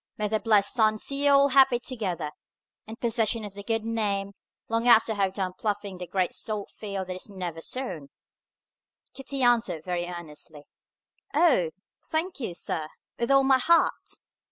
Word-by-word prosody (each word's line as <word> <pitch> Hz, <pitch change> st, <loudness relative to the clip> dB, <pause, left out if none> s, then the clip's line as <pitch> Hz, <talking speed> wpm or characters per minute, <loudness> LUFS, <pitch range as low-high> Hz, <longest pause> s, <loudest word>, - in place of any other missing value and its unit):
May 210 Hz, -, 0 dB
the 220 Hz, 0 st, +1 dB
blessed 210 Hz, -3 st, +3 dB
sun 215 Hz, -3 st, +3 dB
see 275 Hz, +5 st, -1 dB
you 285 Hz, -, +6 dB
all 280 Hz, 0 st, +6 dB
happy 265 Hz, -2 st, +5 dB
together, 195 Hz, -, -4 dB, 0.6 s
in 220 Hz, -, -7 dB
possession 230 Hz, -1 st, 0 dB
of 205 Hz, -, -8 dB
the 200 Hz, -, -8 dB
good 225 Hz, +2 st, -1 dB
name, 205 Hz, -3 st, -1 dB, 0.4 s
long 230 Hz, +1 st, 0 dB
after 230 Hz, -1 st, +6 dB
I -, -, -2 dB
have 195 Hz, -1 st, 0 dB
done 185 Hz, -2 st, -2 dB
ploughing 205 Hz, -1 st, -3 dB
the 180 Hz, -, -6 dB
great 185 Hz, 0 st, 0 dB
salt 210 Hz, -2 st, -4 dB
field 200 Hz, -3 st, -5 dB
that 185 Hz, 0 st, -5 dB
is 185 Hz, -, -6 dB
never 180 Hz, -4 st, -5 dB
sown!" 180 Hz, -, -5 dB, 1.0 s
Kitty 270 Hz, 0 st, -3 dB
answered 235 Hz, -9 st, +2 dB
very 175 Hz, -1 st, -2 dB
earnestly, 155 Hz, -3 st, -8 dB, 0.7 s
"O! 285 Hz, -, +4 dB, 0.3 s
Thank 325 Hz, +1 st, -2 dB
you, 210 Hz, -9 st, -4 dB
sir, 155 Hz, -2 st, -3 dB, 0.3 s
with 235 Hz, -, -1 dB
all 275 Hz, 0 st, +5 dB
my 265 Hz, -1 st, +4 dB
heart!" 335 Hz, +6 st, +2 dB
215 Hz, 170 wpm, -27 LUFS, 185-245 Hz, 1.0 s, you